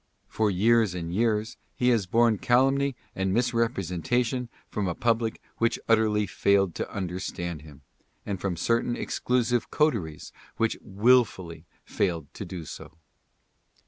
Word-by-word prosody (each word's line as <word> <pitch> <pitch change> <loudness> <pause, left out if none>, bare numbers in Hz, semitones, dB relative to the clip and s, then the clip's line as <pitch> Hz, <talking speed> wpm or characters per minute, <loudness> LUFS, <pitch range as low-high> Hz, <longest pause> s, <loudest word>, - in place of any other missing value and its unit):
For 110 -1 0
years 105 +1 +3
and 85 -1 -4
years 110 +1 0 0.2
he 125 - +2
has 110 -6 +2
borne 115 0 +3
calumny 135 +2 +2 0.2
and 95 0 0
misrepresentation 115 +1 0 0.2
from 105 -2 -2
a 85 - -2
public 115 -1 0 0.2
which 115 0 +2
utterly 110 -2 +3
failed 100 -3 +2
to - - -4
understand 90 -3 -4
him, 75 -2 -15 0.4
and 100 -3 -4
from 90 -3 -2
certain 120 +5 +1
exclusive 125 -1 0
coteries 110 - 0 0.3
which 115 0 +1
willfully 100 -6 +2 0.2
failed 85 -6 -2
to 100 - -6
do 85 -2 -7
so. 80 - -10
105 Hz, 130 wpm, -27 LUFS, 90-120 Hz, 0.4 s, years